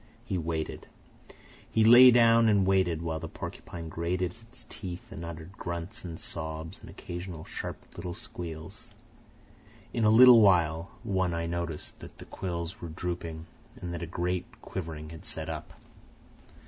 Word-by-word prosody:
He 95 -6 -1
waited. 80 -1 -3 0.8
He 110 - +3
lay 120 +3 +10
down 115 -1 +6
and 100 -3 +4
waited, 95 -4 +2
while 80 -1 -2
the 80 - -5
porcupine 85 0 -7
grated 85 +2 -1 0.2
its 120 -1 -13
teeth 90 -2 -8
and 85 - -7
uttered 85 +1 -7
grunts 85 +4 -6
and 85 -3 -6
sobs 80 0 -5
and - - -12
occasional 85 -2 -7
sharp - - -5 0.2
little 85 0 -5
squeals. 80 -2 -8 1.0
In 115 - 0
a 105 - +6
little 120 +1 +9
while, 85 -4 +4
One 95 -3 0
Eye 85 0 -1
noticed 85 -2 -4
that - - -11
the - - -10
quills 85 -2 -5
were 85 - -5
drooping 85 -1 -4 0.3
and 90 -1 -5
that 85 - -4
a 85 - -4
great 90 +1 -2 0.2
quivering 80 -4 -6
had 80 - -10
set - - -3
up. - - -6
85 Hz, 155 wpm, -29 LUFS, 80-95 Hz, 1.0 s, lay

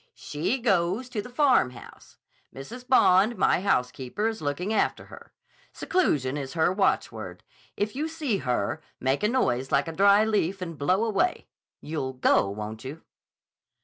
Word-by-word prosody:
"She 150 - -2
goes 200 +1 0
to 220 -4 -3
the 245 - -11
Farmhouse. 245 - 0 0.3
Mrs. 240 - -10
Bond, 215 -3 +4
my 185 - +2
housekeeper, 130 - -1
is 225 -1 -4
looking 155 +8 -2
after - - 0
her. - - -13 0.4
Seclusion 145 - 0
is 135 -2 -5
her 165 +2 +2
watchword. 195 0 -1 0.3
If 210 +2 -2
you 300 +3 -2
see 305 -9 -2
her, 125 - -2 0.2
make 130 +2 0
a 210 - +2
noise 135 - 0
like 140 +2 +2
a - - -3
dry 200 +5 +5
leaf 200 -3 0
and 170 -3 -6
blow 185 +9 +1
away. 285 - 0 0.4
You'll 150 -4 -4
go, 125 -5 +2
won't 105 +2 -6
you?" 145 +5 -8
185 Hz, 150 wpm, -26 LUFS, 135-220 Hz, 0.4 s, dry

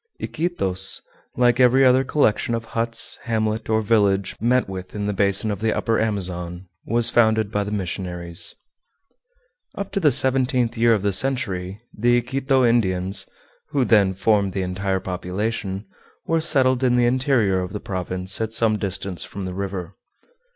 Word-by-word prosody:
Iquitos, 95 - 0 0.4
like 120 0 +3
every 130 +1 +5
other 130 +1 +4
collection 120 -4 +1
of 115 0 -5
huts, 115 0 -1
hamlet, 110 -1 -1
or 110 0 +1
village 100 -3 +1
met 125 +2 +2
with 95 0 -8
in 105 -1 -3
the 105 - -1
basin 100 +2 +1
of 100 - -4
the 110 +1 0
Upper 115 -1 0
Amazon, 90 -4 -2 0.2
was 115 +1 +2
founded 110 -2 +2
by 105 -1 0
the 100 - -5
missionaries. 90 -3 -2 1.2
Up 200 -1 -5
to 200 - -1
the 155 -6 +4
seventeenth 130 -2 +2
year 115 0 +4
of 100 - -3
the 100 -1 0
century 100 -5 -1
the 120 +3 +2
Iquito 130 +2 +1
Indians, 95 -5 +1 0.4
who 135 -3 +1
then 100 -5 +3
formed 100 -1 +1
the 95 - -2
entire 95 +1 -2
population, 95 +2 -4 0.4
were 165 0 +1
settled 130 -4 +3
in 125 -1 +3
the 120 -1 +3
interior 120 -6 +2
of 90 0 -5
the 105 - -5
province 95 +1 -4
at 110 0 -3
some 110 -2 +2
distance 95 -2 -3
from 100 - -7
the 95 -1 -5
river. 95 -2 -5
110 Hz, 160 wpm, -22 LUFS, 95-120 Hz, 1.2 s, every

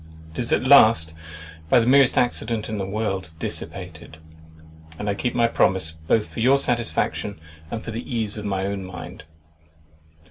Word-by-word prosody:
It - - -7
is 120 - -1
at - - +2
last 115 - +6 0.6
(by 125 - +6
the 115 - +1
merest 135 +1 +5
accident 115 -3 0
in 110 -1 -3
the 95 - -3
world) 95 -4 -3
dissipated; 75 - -3 0.8
and 105 - -5
I 100 - +1
keep 120 +4 -3
my 120 - +3
promise, 95 -7 +2 0.2
both 110 +3 +2
for - - -9
your 130 +4 +4
satisfaction, 115 -6 -1 0.3
and 110 - -5
for 115 - -6
the 115 +1 -4
ease 115 -5 -3
of 105 - -6
my 95 -1 -1
own 100 -1 -3
mind. 90 -2 -9
110 Hz, 170 wpm, -23 LUFS, 95-120 Hz, 0.8 s, last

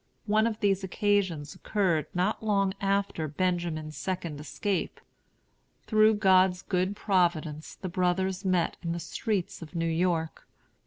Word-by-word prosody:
One 215 +1 +3
of 220 -1 -4
these 195 -2 +2
occasions 190 -6 0
occurred 185 -7 0
not 185 +5 0
long 200 -3 +2
after 195 -5 0
Benjamin's 160 -1 -2
second 175 -5 -4
escape. 180 +6 -2 0.9
Through 215 0 +5
God's 185 -3 +4
good 185 +1 0
providence 170 -7 0
the 185 - -6
brothers 185 +1 0
met 185 -3 +1
in 170 -1 -2
the 170 - -3
streets 200 -1 -3
of 165 +1 -10
New 165 0 0
York. 165 -1 -1
185 Hz, 130 wpm, -28 LUFS, 170-200 Hz, 0.9 s, Through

